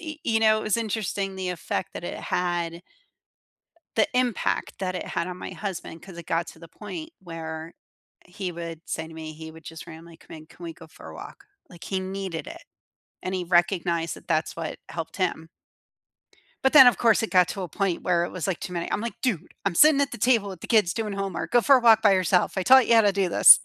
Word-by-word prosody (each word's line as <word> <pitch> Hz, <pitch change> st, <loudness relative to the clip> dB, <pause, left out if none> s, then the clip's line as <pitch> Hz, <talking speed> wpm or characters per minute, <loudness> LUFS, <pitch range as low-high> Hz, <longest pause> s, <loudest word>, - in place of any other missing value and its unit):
y 310 Hz, -2 st, -7 dB
you 225 Hz, -1 st, +1 dB
know, 215 Hz, -1 st, +5 dB
it -, -, -6 dB
was 215 Hz, -, +1 dB
interesting 205 Hz, -3 st, -2 dB
the 185 Hz, -1 st, -4 dB
effect 180 Hz, 0 st, -3 dB
that -, -, -6 dB
it -, -, -4 dB
had 175 Hz, -1 st, -2 dB, 1.1 s
the 220 Hz, -, +4 dB
impact 250 Hz, -3 st, 0 dB
that 185 Hz, -1 st, -2 dB
it -, -, -4 dB
had 170 Hz, -, -2 dB
on 180 Hz, 0 st, -6 dB
my -, -, -6 dB
husband 185 Hz, -4 st, -6 dB
'cause 180 Hz, -1 st, -12 dB
it 170 Hz, -2 st, -9 dB
got 165 Hz, +1 st, 0 dB
to -, -, -12 dB
the 165 Hz, -, -12 dB
point 315 Hz, -, -8 dB
where 165 Hz, -2 st, -7 dB, 0.5 s
he 180 Hz, 0 st, -5 dB
would 165 Hz, -1 st, -7 dB
say 160 Hz, 0 st, -4 dB
to 160 Hz, -, -12 dB
me, 160 Hz, -1 st, -7 dB
he 160 Hz, +1 st, -9 dB
would 160 Hz, 0 st, -15 dB
just 160 Hz, 0 st, -9 dB
randomly 165 Hz, +1 st, -12 dB
come 165 Hz, -, -13 dB
in, 155 Hz, -, -13 dB
"Can 175 Hz, -, -17 dB
we 165 Hz, -, -5 dB
go 160 Hz, -, -14 dB
for -, -, -14 dB
a -, -, -11 dB
walk?" -, -, -11 dB, 0.3 s
Like, 175 Hz, -1 st, -15 dB
he 190 Hz, -, -2 dB
needed 190 Hz, -3 st, -5 dB
it, 335 Hz, +2 st, -9 dB, 0.6 s
and 185 Hz, -, -3 dB
he 185 Hz, -, -1 dB
recognized 175 Hz, -1 st, +1 dB
that -, -, -16 dB
that's 160 Hz, -2 st, 0 dB
what 165 Hz, -2 st, -5 dB
helped 165 Hz, -2 st, -6 dB
him. 170 Hz, -4 st, -2 dB, 1.2 s
But 265 Hz, -, +3 dB
then, 265 Hz, -4 st, +10 dB
of 245 Hz, -, +5 dB
course, 230 Hz, -2 st, +4 dB
it 225 Hz, -, -2 dB
got 180 Hz, -2 st, +4 dB
to 195 Hz, -, -4 dB
a 180 Hz, -, -4 dB
point 185 Hz, +1 st, -1 dB
where 175 Hz, -1 st, +1 dB
it -, -, -8 dB
was, 180 Hz, -5 st, -4 dB
like, 190 Hz, -, -1 dB
too 180 Hz, -, -6 dB
many. 170 Hz, -1 st, -3 dB
I'm -, -, -1 dB
like, 235 Hz, 0 st, -4 dB
"Dude, 195 Hz, -, -2 dB
I'm 195 Hz, -3 st, 0 dB
sitting 300 Hz, -, +6 dB
at 280 Hz, -, 0 dB
the -, -, -6 dB
table 225 Hz, -3 st, +2 dB
with 185 Hz, -4 st, -9 dB
the -, -, -8 dB
kids 210 Hz, -6 st, +3 dB
doing 215 Hz, -2 st, -3 dB
homework. 195 Hz, -2 st, -4 dB
Go 240 Hz, -, +5 dB
for 275 Hz, +1 st, +6 dB
a -, -, +1 dB
walk 225 Hz, -2 st, +6 dB
by 205 Hz, -3 st, +5 dB
yourself. 185 Hz, 0 st, +2 dB
I 190 Hz, -, +1 dB
taught 260 Hz, +4 st, +7 dB
you 235 Hz, -, +5 dB
how 225 Hz, -, +7 dB
to 205 Hz, -2 st, +3 dB
do 195 Hz, -2 st, 0 dB
this." -, -, +9 dB
185 Hz, 245 wpm, -25 LUFS, 170-215 Hz, 1.2 s, then